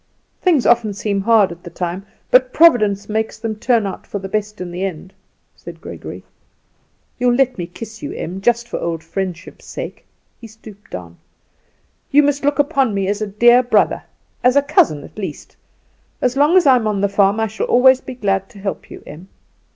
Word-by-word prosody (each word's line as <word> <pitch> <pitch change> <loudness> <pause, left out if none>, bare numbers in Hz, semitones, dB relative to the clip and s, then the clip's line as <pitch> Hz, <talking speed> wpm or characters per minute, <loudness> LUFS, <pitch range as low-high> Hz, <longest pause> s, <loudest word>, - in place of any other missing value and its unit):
"Things 330 -9 +2
often 220 -4 +3
seem 200 -1 -1
hard 210 -3 +4
at 170 0 -10
the 175 - -10
time, 180 +3 -5 0.2
but 255 0 +5
Providence 215 -12 +4
makes 220 +1 -2
them 220 -1 -4
turn 230 0 +1
out 195 - -6
for - - -4
the 195 -1 -6
best 210 +1 -3
in 180 -1 -6
the 180 +2 -4
end," 185 0 -5 0.4
said - - -11
Gregory. - - -9 1.0
"You'll 245 0 +3
let 260 -4 +1
me 175 - -3
kiss 220 +5 -10
you, - - -5
Em, 185 +3 -6
just 235 +2 +1
for - - -4
old 165 -1 -3
friendship's 185 +1 -6
sake." - - -7 0.4
He 230 - -10
stooped 215 -2 -15
down. 85 -2 -9 0.9
"You 295 +2 +5
must 285 0 0
look 285 -1 +1
upon 270 -6 +1
me 195 -1 -1
as 205 +1 -2
a 215 - -1
dear 240 +5 +5
brother, 245 - +1 0.4
as 250 +1 +4
a 285 - +4
cousin 170 - +2
at - - -12
least; 185 -7 -7 0.6
as 250 0 0
long 295 +6 +4
as 365 - +4
I 265 -2 +6
am 220 -3 -1
on 205 -2 -1
the 200 - +3
farm 200 +1 +2
I 225 - +2
shall 220 0 -4
always 260 +1 +5
be 255 - -8
glad 195 -4 -1
to 230 - -16
help 195 -1 -5
you, - - -11
Em." 160 +6 -11
215 Hz, 200 wpm, -18 LUFS, 195-245 Hz, 1.0 s, I